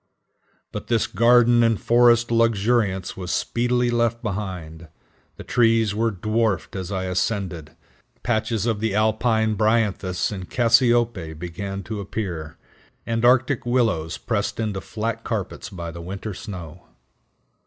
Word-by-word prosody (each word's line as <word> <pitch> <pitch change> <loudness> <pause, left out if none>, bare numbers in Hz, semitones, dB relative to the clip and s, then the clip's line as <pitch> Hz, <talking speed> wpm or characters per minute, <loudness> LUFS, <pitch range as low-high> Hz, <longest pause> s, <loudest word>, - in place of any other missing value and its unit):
But - - -6
this 115 -2 +2
garden 120 0 +4
and 115 -3 +2
forest 120 0 +4
luxuriance 110 -4 +1
was 90 -2 -6
speedily 120 +4 0
left 115 0 0
behind. 90 -6 -5 0.5
The - - -8
trees 115 -3 +2
were 115 +2 +1
dwarfed 110 -1 -1
as 95 0 -5
I 95 -2 -2
ascended; 90 -4 -2 0.5
patches 110 -2 0
of 115 -3 0
the 110 -2 -1
alpine 110 +1 +2
bryanthus 105 -4 0
and 95 -3 -6
cassiope 115 -8 +2
began 95 +4 -5
to 110 +1 -5
appear, 85 -6 -5 0.5
and 115 0 -1
arctic 130 +2 +3
willows 110 -10 0
pressed 110 -2 -2
into 105 -4 -2
flat 115 +1 -4
carpets 100 -4 -4
by 85 -4 -6
the 85 +1 -9
winter 100 +4 -6
snow. 90 -7 -8
110 Hz, 130 wpm, -23 LUFS, 95-115 Hz, 0.5 s, garden